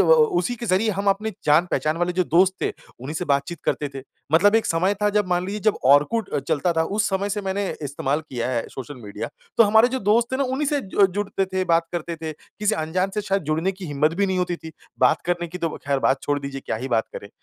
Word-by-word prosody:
ओ - - +6 0.3
उसी 245 - -1
के 235 - -6
ज़रिए 205 +3 +2
हम 200 +1 -3
अपने 210 +3 -1
जान-पहचान 155 0 +2
वाले 175 +1 0
जो 180 0 +1
दोस्त 180 +4 +4
थे, - - +2 0.3
उन्हीं 140 +5 -6
से 180 - -2
बातचीत 140 +4 0
करते 145 - 0
थे। 135 - -6 0.3
मतलब 200 +6 +5
एक 225 - +3
समय 180 +5 +1
था 210 - +4
जब 210 -1 +1
मान 180 0 +1
लीजिए, 210 +2 -4
जब 215 0 +1
ऑरकुट 150 +12 +4
अ, - - +2
चलता 150 +5 0
था, 160 - +2
उस 210 +5 0
समय 195 +1 0
से 205 +1 -1
मैंने 195 +1 -1 0.2
इस्तेमाल 140 +1 -1
किया 125 -6 -4
है 120 -3 -1
सोशल 135 +1 -8
मीडिया। 100 - -5 0.3
तो - - +9
हमारे 220 +3 +5
जो 260 +1 -2
दोस्त 230 +2 +2
थे 260 - +1
ना, 275 - +1
उन्हीं 265 +3 -1
से 290 -2 +1
जु 195 +1 +3
जुड़ते 195 +1 -2
थे, 185 0 -1
बात 165 -1 +2
करते 170 0 -3
थे। 160 -1 -3
किसी 210 +7 -3
अनजान 185 +3 -1
से 210 - 0
शायद 195 -2 0
जुड़ने 160 +5 0
की 185 -2 -9
हिम्मत 150 +2 +1
भी 200 +2 +1
नहीं 190 -1 0
होती 180 -1 -1
थी 160 -1 -10 0.3
बात 125 -1 +4
करने 175 -1 -1
की 180 +2 -7
तो 165 - 0 0.2
ख़ैर 140 -1 +1
बात 135 0 +2
छोड़ 145 0 0
दीजिए, 140 -1 -6
क्या - - -1
ही 130 +4 -5
बात 115 -3 +1
करें। 100 - -7
180 Hz, 255 wpm, -23 LUFS, 150-205 Hz, 0.3 s, तो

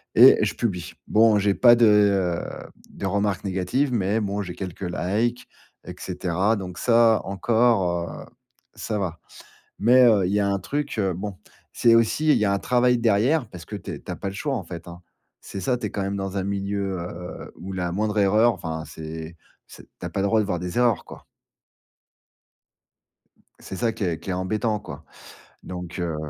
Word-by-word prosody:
et - - +9
je - - -1
publie. 90 -7 -3
Bon, 110 -1 +5
j'ai 100 0 +2
pas 120 -1 +7
de, 120 -1 +5
heu, 100 -4 +1 0.2
de 100 - -7
remarques 100 -1 0
négatives, 100 +9 0
mais 105 0 +1
bon 100 0 -2
j'ai 90 -3 -6
quelques 95 -2 -7
likes 110 +8 -1 0.4
et - - -6
cetera, 95 +5 0
donc 90 -2 -7
ça, 115 -2 +4
encore, 100 -4 +1 0.2
heu, - - -13 0.5
ça 105 -1 -3
va. 85 -4 -3 0.6
Mais 125 +4 +6
heu, 105 -5 +4
il 90 - -1
y 105 - +2
a 100 - +1
un 100 0 0
truc, 145 +7 -3
heu 95 -3 +1
bon. 95 +1 -6 0.4
C'est 115 -1 +4
aussi 115 +7 +2
il - - +5
y 105 - +1
a 100 - +2
un 100 - 0
travail 125 +1 +2
derrière 120 +5 +2
parce 85 -3 -10
que - - -7
tu - - -7
es - - -6
tu - - -7
as - - -3
pas 100 - -4
le - - -8
choix, 140 +5 -2
en 105 - -3
fait, 85 0 -9
hein. 85 0 -10 0.4
C'est 95 - -7
ça, 125 +7 0
tu - - -5
es - - -8
quand 100 - -3
même 100 +1 -2
dans 95 0 -4
un 95 - -1
milieu, 100 -1 -2
heu, 90 +1 -8
où 95 +3 -8
la 90 -2 -2
moindre 105 +2 -1
erreur, 105 +4 +4
enfin 80 -4 -5
c'est 80 +1 -8 0.3
c'est - - -13 0.2
tu - - -6
as - - -3
pas - - -4
le 100 - +1
droit 110 +1 +3
de 105 - -2
voir 90 -3 -2
des 90 +4 -5
erreurs, 120 -4 +2
quoi. - - -12 2.3
C'est 95 - -8
ça 115 -2 +1
qui 110 - -5
est 85 -4 -1
qui 85 - -9
est - - 0
embêtant, 105 +4 -1
quoi. - - -10 0.6
Donc, 90 -1 -7
heu 85 -3 -2
100 Hz, 205 wpm, -24 LUFS, 90-115 Hz, 2.3 s, et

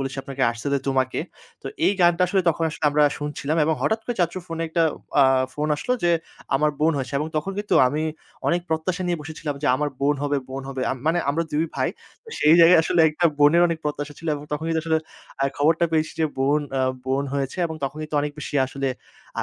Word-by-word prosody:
বলেছি 135 0 -4
আপনাকে 135 -1 -8
'Artcell' 120 +5 -2
এর 135 - -4
'তোমাকে'। 130 -1 0 0.4
তো - - -8 0.2
এই 200 - +4
গানটা 175 +1 +4
আসলে 190 +1 +2
তখন 165 0 0
আসলে 155 - -6
আমরা 150 +1 +3 0.2
শুনছিলাম 150 +1 -3
এবং 160 0 +2
হঠাৎ 220 +1 +1
করে 245 - -2
চাচ্চুর 175 +1 0
ফোনে 165 0 -4
একটা 165 +1 +1 0.4
আ - - +6 0.3
ফোন 150 +1 -2
আসলো 250 +12 -2
য্‌ - - +2 0.5
আমার 150 +2 +3
বোন 160 +1 +3
হয়েছে 135 +1 -4
এবং 150 - -2
তখন 190 +6 -2
কিন্তু 205 -3 -1
আমি 150 +3 -2 0.5
অনেক 175 +1 +2
প্রত্যাশা 165 +3 -1
নিয়ে 175 -2 0
বসেছিলাম 155 -1 -5
যে - - 0
আমার 150 +1 -1
বোন 145 +1 +3
হবে 145 0 0
বোন 135 +1 -5
হবে। 130 -1 -4
আমি 130 - -4
মানে 170 +2 +2
আমরা 165 +3 0
২ 155 +2 +1
ভাই - - 0 0.4
তো - - -15
সেই 155 +2 +6
জায়গায় 165 +1 +8
আসলে 170 - +2
একটা 170 +3 -2
বোনের 150 +4 +5
অনেক 165 -1 -2
প্রত্যাশা 145 0 -3
ছিলো 165 -1 -3
এবং 145 0 -7
তখন 150 +2 -2
কিন্তু 160 -1 +1
আসলে 160 -1 +2 0.4
আ - - +4
খবরটা 160 +4 +3
পেয়েছি 155 0 +1
যে - - +4
বোন 145 +3 +2
অ্যা 135 -1 0 0.2
বোন 135 +2 0
হয়েছে 135 +4 -2
এবং 160 - -6
তখন 135 - -4
কিন্তু 155 0 -7
অনেক 145 0 -3
বেশি 145 - -6
আসলে 135 0 -3 0.5
আ - - 0
150 Hz, 225 wpm, -23 LUFS, 140-165 Hz, 0.5 s, জায়গায়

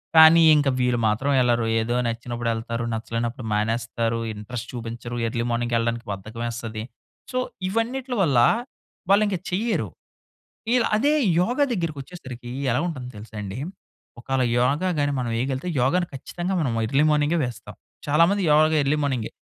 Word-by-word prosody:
కానీ, 160 +1 +9
ఇంక 145 -1 +2
వీరు 125 -1 +2
మాత్రం 110 +7 0
వెళ్లరు. 120 -2 +2
ఏదో 115 +2 -1
నచ్చినప్పుడు 115 0 -3
ఎళ్తారు, 115 +1 -3
నచ్చలేనప్పుడు 115 +2 -3
మానేస్తారు, 115 +1 -1
ఇంట్రెస్ట్ 115 +3 -6
చూపించరు, 120 0 -6
ఎర్లీ 115 0 -2
మార్నింగేళ్ళడానికి 120 0 -1
బద్ధకమేస్తది. 110 +2 -5 0.5
సో 255 - -2 0.3
ఇవన్నిట్ల 245 +5 -2
వల్ల 140 -9 +3 0.7
వాళ్ళు 200 +2 +5
ఇంక 195 -2 -1
చెయ్యరు. 190 - 0 0.8
వీళ్ళు 240 0 +3
అదే 280 +8 +3 0.3
యోగా 245 +10 +1
దగ్గరికొచ్చేసరికి 145 - -5 0.2
ఎలా - - +1
ఉంటుందో 130 -7 -5
తెలుసా 110 +1 -11
అండి? 100 +1 -6 0.6
ఒకాళ 135 +2 -1 0.2
యోగా 140 +9 +2
గాని 145 0 +1
మనమేయగలిగితే 130 +5 -2
యోగాని 175 +8 +2
ఖచ్చితంగా 175 +7 -4
మనం 135 -8 0
ఎర్లీ 140 +5 +2
మార్నింగే 150 +3 +2
వేస్తాం. 120 -3 -8 0.3
చాలా 150 +3 +5
మంది 200 0 +1
యోగా 155 +1 +5
ఎర్లీ 140 +2 +1
మార్నింగే. 130 -6 -1
125 Hz, 135 wpm, -24 LUFS, 115-160 Hz, 0.8 s, కానీ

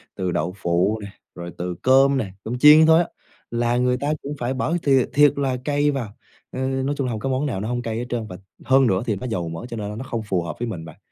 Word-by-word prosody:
từ 90 -2 -2
đậu 85 +3 -2
phụ 90 +5 +1
nè, 100 - -7 0.3
rồi 85 0 -7
từ 90 0 -4
cơm 135 +1 +5
nè, 100 -7 -3
cơm 120 +2 -4
chiên 150 +2 +8
thôi 160 +1 +6
á, - - -10 0.4
là 120 +1 0
người 125 0 +2
ta 145 +3 -1
cũng 145 - -4
phải 125 +2 -1
bỏ 145 +5 -1
thiệt 135 -3 +3
thiệt 145 0 +5
là 135 -3 0
cay 145 0 +2
vào, 120 -7 -4 0.4
ờ, 130 - -6
nói 135 +2 -1
chung 135 - -1
hổng 115 -3 -3
có 135 - -3
món 130 +3 0
nào 115 -9 -2
nó 110 - -3
hông 120 0 -2
cay 115 -2 -4
hết 120 - -3
trơn, 115 -3 -3
và 90 - -8 0.3
hơn 135 0 +4
nữa 95 -3 +1
thì 110 - 0
nó 125 +6 -6
dầu 90 -6 -2
mỡ, 80 +8 -6
cho 115 - -6
nên 105 0 -5
nó 130 - -5
không 120 -4 -4
phù 95 -4 0
hợp 85 - -5
với 120 - -2
mình 85 -7 -6
bạn. 80 - -12
120 Hz, 275 wpm, -22 LUFS, 100-135 Hz, 0.4 s, chiên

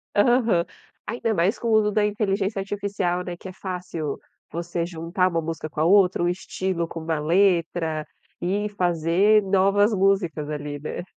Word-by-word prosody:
Aham, 225 -5 +3 0.4
ainda 230 -1 -1
mais 180 +4 +1
com 235 - -3
o - - +2
uso 215 -1 +4
da 210 0 +2
Inteligência 205 -1 0
Artificial 195 -3 -2
né, 175 -1 -5
que 190 - -10
é - - -8
fácil 180 -6 -5 0.3
você 170 0 -3
juntar 170 +2 -1
uma 165 -2 -1
música 160 -1 -5
com 155 - -5
a - - +3
outra, 185 -1 +4
o 175 - +2
estilo 180 -1 -2
com 165 - -7
uma 160 -1 -2
letra, 165 -2 +1 0.3
e 200 +4 -1
fazer 180 +3 +3
novas 200 +2 +3
músicas 185 -6 +1
ali, 145 -1 -4
né. 150 +4 -5
180 Hz, 165 wpm, -24 LUFS, 165-200 Hz, 0.4 s, uso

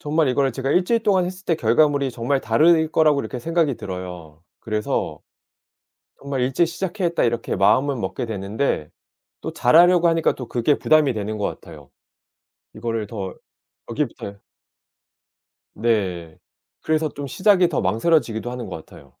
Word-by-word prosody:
정말 155 +1 +1
이거를 135 +1 +1
제가 135 +2 -3
1 180 +4 +3
주일 230 +3 +1
동안 190 -4 +3
했을 185 +2 -8
때 170 - +1
결과물이 140 +1 +2
정말 125 +3 -1
다를 160 +8 +3
거라고 155 -3 +3
이렇게 130 - -6
생각이 160 -1 0
들어요. 90 -4 -8 0.2
그래서 110 -1 -3 1.0
정말 140 -1 -3
'일찍 135 +7 +2
시작해야겠다.' 175 +1 -2
이렇게 120 0 -1
마음을 115 +9 +3
먹게 120 +3 -4
되는데 100 - -2 0.5
또 - - -5
잘하려고 170 +6 +5
하니까 165 -1 +2
또 125 - -8
그게 125 +5 +1
부담이 155 -3 +3
되는 105 0 -4
것 105 - -1
같아요. 75 -6 -9 0.9
이거를 115 -1 -3
더 100 -4 -6 0.6
여기부터요. 115 -6 -4 1.4
네. 95 -8 -1 0.4
그래서 155 0 0
좀 145 0 -7
시작이 185 - +3
더 150 - -1
망설여지기도 115 - 0
하는 125 -2 -6
것 95 - -6
같아요. 70 - -16
130 Hz, 340 characters per minute, -22 LUFS, 110-160 Hz, 1.4 s, 잘하려고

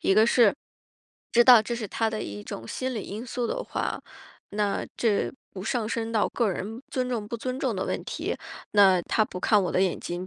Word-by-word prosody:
一 195 - +3
个 215 +2 +6
是 235 -3 +5 0.8
知 240 0 +5
道 245 -2 +9
这 235 +2 -3
是 230 -2 -4
他 225 +3 0
的 220 -1 -3
一 105 0 -6
种 115 +2 -7
心 255 - -3
理 215 - -3
因 215 +5 -6
素 245 0 -2
的 - - -2
话， - - -3 0.5
那 205 0 -1
这 220 -4 +1 0.2
不 185 - -7
上 225 +1 -1
升 225 0 -2
到 220 -2 +2
个 235 -3 +1
人 220 +6 -5
尊 255 -1 -1
重 220 -4 -3
不 235 - -3
尊 255 +3 -4
重 - - 0
的 - - -1
问 - - -2
题， - - -3 0.4
那 190 -3 +5
他 215 - +1
不 195 -4 -4
看 205 +2 +3
我 180 - -1
的 185 - +2
眼 185 -2 0
睛， 175 +1 -5
220 Hz, 240 characters per minute, -26 LUFS, 195-235 Hz, 0.8 s, 道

